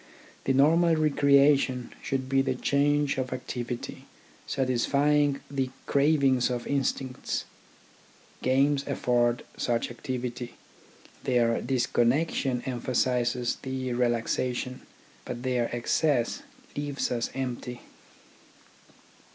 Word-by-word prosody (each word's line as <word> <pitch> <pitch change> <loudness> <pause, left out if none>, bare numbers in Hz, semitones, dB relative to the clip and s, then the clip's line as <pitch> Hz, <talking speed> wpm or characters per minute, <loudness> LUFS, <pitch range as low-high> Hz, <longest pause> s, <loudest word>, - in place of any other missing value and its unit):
The 135 - +2
normal 165 +5 +4
recreation 140 -4 +3
should 130 -1 -2
be 135 0 +3
change 145 +1 +1
of 130 -1 -3
activity, 125 -1 -5 0.4
satisfying 140 +3 +2
the 135 -2 -1 0.2
crav 145 +1 +3
ings 130 -2 +3
of 120 -1 -3
instincts. 135 -2 -2 1.0
Games 135 +2 +2
afford 120 -3 +1
such 120 0 -1
activity. 125 0 -5 0.7
Their 120 -3 +2
disconnection 125 +1 +1
emphasises 125 -1 0
the 130 -1 -3
relaxation, 125 +1 -1 0.4
but 120 0 -6
their 125 -2 0
excess 120 +1 +1 0.3
leaves 145 -1 -2
us 120 -1 -1
empty. 125 -2 -4
130 Hz, 90 wpm, -28 LUFS, 120-140 Hz, 1.0 s, normal